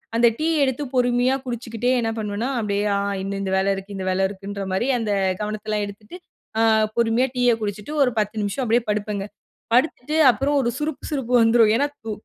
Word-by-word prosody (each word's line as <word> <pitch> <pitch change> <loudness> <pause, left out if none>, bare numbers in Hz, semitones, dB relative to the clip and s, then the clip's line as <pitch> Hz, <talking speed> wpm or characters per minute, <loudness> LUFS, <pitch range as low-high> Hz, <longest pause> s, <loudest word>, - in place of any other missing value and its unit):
அந்த 235 +1 +5
டீ 315 - 0 0.2
எடுத்து 265 +2 -1
பொறுமையா 245 +1 +2
குடிச்சுக்கிட்டே 240 0 -2
என்ன 225 - -1
பண்ணுவேன்னா? 215 +4 -2
அப்பிடியே 205 -1 -1
ஆ - - +1 0.3
இந்த, 195 0 -3
இந்த 190 -1 -2
வேல 195 +1 +2
இருக்கு. 195 +1 -8
இந்த 190 -1 -4
வேலை 190 +1 +1
இருக்குன்றமாரி 200 +2 -3
அந்த 215 -2 -2 0.3
கவனத்தெல்லாம் 210 0 -2
எடுத்துட்டு, 210 - -11 0.4
அ - - +4 0.4
பொறுமையா 235 +3 +2
அ - - -32
டீய 245 -1 +3
குடிச்சுட்டு, 210 +7 -4
ஒரு 250 - +1
10 210 +1 -1
நிமிஷம் 205 +6 -2
அப்பிடியே 235 0 +2
படுப்பேங்க. 205 -1 -2 0.5
படுத்துட்டு 265 +2 +1 0.2
அப்புறம் 275 +6 -1
ஒரு 235 - 0
சுருப் 300 -1 -4
சுருப்பு 265 -5 -3
வந்துரும். 225 -1 +5
ஏன்னா, 285 +4 +2 0.2
தூ 220 - -3
225 Hz, 180 wpm, -22 LUFS, 205-250 Hz, 0.5 s, அந்த